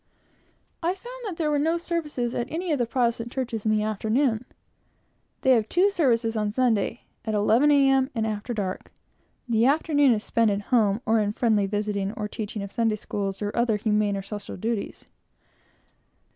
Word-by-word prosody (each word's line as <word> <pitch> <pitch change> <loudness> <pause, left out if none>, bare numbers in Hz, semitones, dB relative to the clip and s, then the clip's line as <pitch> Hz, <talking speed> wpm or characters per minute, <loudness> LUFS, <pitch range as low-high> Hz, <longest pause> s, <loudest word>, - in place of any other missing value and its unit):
I 350 +2 0
found - - -10
that 375 -6 -5
there 310 -3 0
were 295 - +2
no 325 +3 +1
services 305 -8 -2
at 235 - -2
any 340 +2 -2
of 290 - +1
the 240 - +1
Protestant 235 -1 0
churches 235 -5 -3
in - - +3
the 215 0 +2
afternoon. 220 +3 0 1.0
They 265 - +4
have 225 -4 +3
two 380 +4 +3
services 235 - +1
on 210 -1 0
Sunday; 230 -1 0 0.2
at 220 -2 -2
11 225 +7 +4
A. 280 -2 +5
M., 270 -1 +3
and 225 -1 0
after 215 +2 -3
dark. 200 -5 -4 0.6
The 230 0 +3
afternoon 290 -2 +3
is 215 -1 -2
spent 230 -1 +2
at 200 0 -1
home, 215 -2 +3
or 225 0 +3
in 205 -1 0
friendly 215 -4 +2
visiting, 205 -1 -2
or 210 -2 -4
teaching 210 -1 -5
of 200 - -7
Sunday 225 -2 +1
Schools, 200 -1 -4
or 205 - -3
other 235 -3 +2
humane 210 -1 +1
and 195 -1 -5
social 205 0 -7
duties. 220 +2 -3
230 Hz, 185 wpm, -25 LUFS, 210-270 Hz, 1.0 s, A